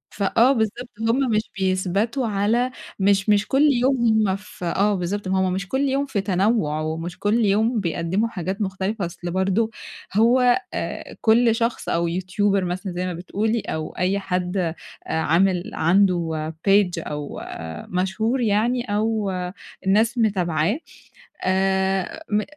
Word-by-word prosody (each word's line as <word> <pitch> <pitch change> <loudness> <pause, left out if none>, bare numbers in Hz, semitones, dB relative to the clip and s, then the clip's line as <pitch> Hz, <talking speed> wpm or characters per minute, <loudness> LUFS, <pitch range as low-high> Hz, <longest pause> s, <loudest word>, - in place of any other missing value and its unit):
ف 200 - -2
فآه، 230 +6 +4
بالضبط، 235 +1 -2 0.2
هُم 255 +2 +2
مش 215 +1 0
بيثبَتوا 195 +6 0
على 220 +5 +1 0.3
مش 195 +1 +2
مش 205 0 +3
كل 270 +2 +2
يوم 260 +1 +2 0.3
هُم 190 - +1
ف 210 -2 -11
آه 200 +4 +1
بالضبط، 190 +2 -3
ما 190 0 +1
هُم 185 -1 +1
مش 195 +1 -3
كل 265 +5 -1
يوم 275 +1 0
في 220 -7 -2
تنوُع، 190 -5 +1
ومش 165 +2 -4
كل 220 +2 +2
يوم 220 +3 +2
بيقدموا 175 +4 -1
حاجات 190 +1 -4
مختلفة. 190 +1 -2
أصل 175 0 -6
برضو 195 +4 +1 0.4
هو 245 - +4
آآ - - -5
كل 230 0 +4
شخص 230 0 -1
أو 170 0 +1
يوتيوبر 190 +3 0
مثلًا 180 +2 -3
زي 180 +1 -2
ما 180 - -3
بتقولي، 210 +6 -1
أو 155 0 -4
أي 185 +3 +1
حد 180 -2 -1 0.3
عامل 175 +3 +1
عنده 165 -3 +1 0.2
page 195 -2 +5 0.2
أو 150 -1 -5 0.5
مشهور 190 +8 0
يعني، 235 +3 +1
أو 215 -2 0 0.6
الناس 220 +5 +3
متابعاه، 190 - +1 0.7
آآ 190 - 0
م 210 +1 +2
195 Hz, 145 wpm, -23 LUFS, 180-225 Hz, 0.7 s, page